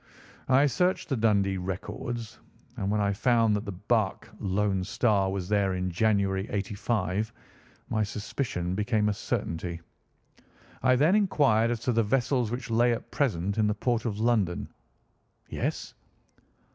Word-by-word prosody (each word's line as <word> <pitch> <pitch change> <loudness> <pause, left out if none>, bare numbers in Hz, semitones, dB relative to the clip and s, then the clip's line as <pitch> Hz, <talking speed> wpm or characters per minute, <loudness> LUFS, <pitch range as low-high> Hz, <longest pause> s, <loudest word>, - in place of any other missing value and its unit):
"I 135 +2 +5
searched 180 +7 +1
the 135 - +1
Dundee 100 -4 +2
records, 115 +6 -5 0.4
and 100 -5 -2
when 105 +1 +1
I 100 -1 +1
found 115 0 +3
that 105 +2 -3
the 100 - -4
barque 105 +2 -1
Lone 95 -1 0
Star 105 -2 +1
was 95 -2 -3
there 100 -2 +1
in 90 0 -2
January, 100 0 +1
'85, 105 0 -1 0.6
my 110 - 0
suspicion 105 -3 -3
became 105 +1 +1
a - - +1
certainty. 85 -2 -3 1.0
I 130 0 +4
then 150 +8 +4
inquired 145 - +3
as 120 -2 -2
to 125 - 0
the 115 -1 +3
vessels 125 +1 +1
which 120 0 -5
lay 120 +2 +4
at 115 - -6
present 100 - 0
in 105 - +3
the 105 - 0
port 120 +1 -1
of 105 -3 -2
London." 110 -6 +1 0.8
"Yes?" - - -3
105 Hz, 145 wpm, -28 LUFS, 100-120 Hz, 1.0 s, I